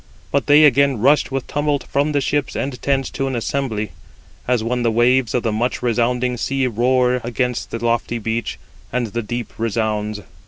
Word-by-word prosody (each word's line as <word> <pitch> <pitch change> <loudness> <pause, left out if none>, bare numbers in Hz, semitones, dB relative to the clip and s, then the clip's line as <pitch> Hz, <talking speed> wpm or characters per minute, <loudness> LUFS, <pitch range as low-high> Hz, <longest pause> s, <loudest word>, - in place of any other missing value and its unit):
But 140 -3 0
they 150 +1 +7
again 140 -2 +4
rushed 140 +5 +3
with 135 -1 -2
tumult 145 -1 -1
from 145 +2 0
the 145 -1 +1
ships 145 +1 -1
and 130 -3 -3
tents 135 -1 0
to 135 - -2
an 130 - -2
assembly, 115 -4 -2 0.6
as 125 -3 +1
when 125 +2 -1
the 120 - +2
waves 120 +2 +2
of 125 - 0
the 115 - 0
much 120 +4 -1
resounding 125 +1 +1
sea 135 +2 0
roar 125 +1 +2
against 125 +1 -2
the 115 +1 -4
lofty 120 0 0
beach, 115 +1 -3 0.3
and 125 0 0
the 115 +2 -3
deep 120 +2 -5
resounds. 110 -2 -1
125 Hz, 185 wpm, -20 LUFS, 115-135 Hz, 0.6 s, they